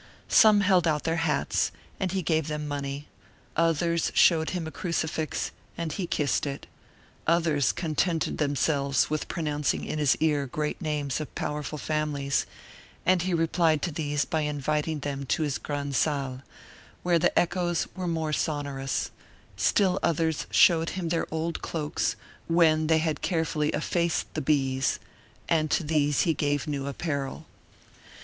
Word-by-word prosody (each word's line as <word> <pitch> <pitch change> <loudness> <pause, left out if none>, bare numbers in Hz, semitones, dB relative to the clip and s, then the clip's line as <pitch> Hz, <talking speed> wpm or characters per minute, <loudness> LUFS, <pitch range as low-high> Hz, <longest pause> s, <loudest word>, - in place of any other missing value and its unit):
Some 215 -2 +7
held 185 -3 +4
out 150 -2 +1
their 165 0 0
hats, 150 -2 +1 0.3
and 185 -2 -1
he 190 -1 -1
gave 160 0 +1
them 150 -1 -3
money; 140 0 -4 0.5
others 165 +1 +1
showed 160 -2 +5
him 180 -3 -3
a 160 - -5
crucifix, 160 -3 -2 0.3
and 165 -2 -3
he 185 -4 -3
kissed 145 -2 0
it; 140 0 -5 0.6
others 155 -7 +3
contented 165 - -1
themselves 140 -1 +1
with 155 - -1
pronouncing 150 -3 -1
in 155 - -3
his 145 -4 +4
ear 150 -3 +1
great 150 +6 -3
names 150 -4 -1
of 155 - -8
powerful 150 0 -3
families, 150 -2 -1 0.6
and 185 -1 +4
he 185 +2 -1
replied 165 -2 +2
to 175 - 0
these 145 -2 -1
by 160 - -1
inviting 150 +1 -1
them 140 -1 -3
into 140 +4 0
his 145 -3 -1
grand' 145 -1 -3
salle, 135 -3 0 0.6
where 175 -1 +3
the - - +1
echoes 175 -1 +1
were 185 -1 -3
more 160 -2 -1
sonorous; 140 -3 -2 0.4
still 190 -3 +2
others 160 -2 0
showed 165 -2 +5
him 180 -3 -3
their 165 0 -1
old 160 +1 -2
cloaks, 155 -1 -2 0.3
when 160 -2 +4
they 160 0 +4
had 155 -1 -1
carefully 160 -3 0
effaced 170 0 -1
the - - -2
bees, 135 -2 +1 0.5
and 155 -2 +2
to - - +1
these 150 -2 +2
he 165 - +2
gave 145 -1 0
new 140 -3 -3
apparel. 140 -2 -3
155 Hz, 150 wpm, -27 LUFS, 145-165 Hz, 0.6 s, Some